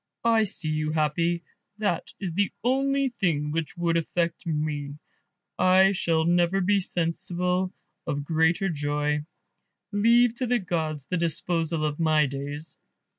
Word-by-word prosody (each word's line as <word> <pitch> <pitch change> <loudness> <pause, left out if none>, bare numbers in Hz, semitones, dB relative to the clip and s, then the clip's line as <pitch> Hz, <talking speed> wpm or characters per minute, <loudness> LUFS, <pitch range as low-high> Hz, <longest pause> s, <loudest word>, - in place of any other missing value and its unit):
I 225 -2 +4
see 180 -5 -3
you 155 0 -1
happy, 165 +3 0 0.3
that 205 -5 -1
is 185 -5 -3
the 200 +3 +1
only 275 +2 +2
thing 160 -11 -1
which 165 +2 -3
would 170 -1 +1
affect 170 +1 -2
me; 150 -2 -2 0.6
I 185 +1 +5
shall 165 -4 +1
never 175 +2 +3
be 200 +2 +3
sensible 180 +1 -1 0.4
of 145 0 -2
greater 165 +5 +2
joy; 150 -2 -1 0.7
leave 230 +3 +4
to 255 - -1
the 245 +1 +2
gods 160 - -3
the 180 - -2
disposal 165 -1 0
of 150 0 -2
my 155 -2 +3
days." 145 +3 -6
170 Hz, 135 wpm, -26 LUFS, 155-190 Hz, 0.7 s, I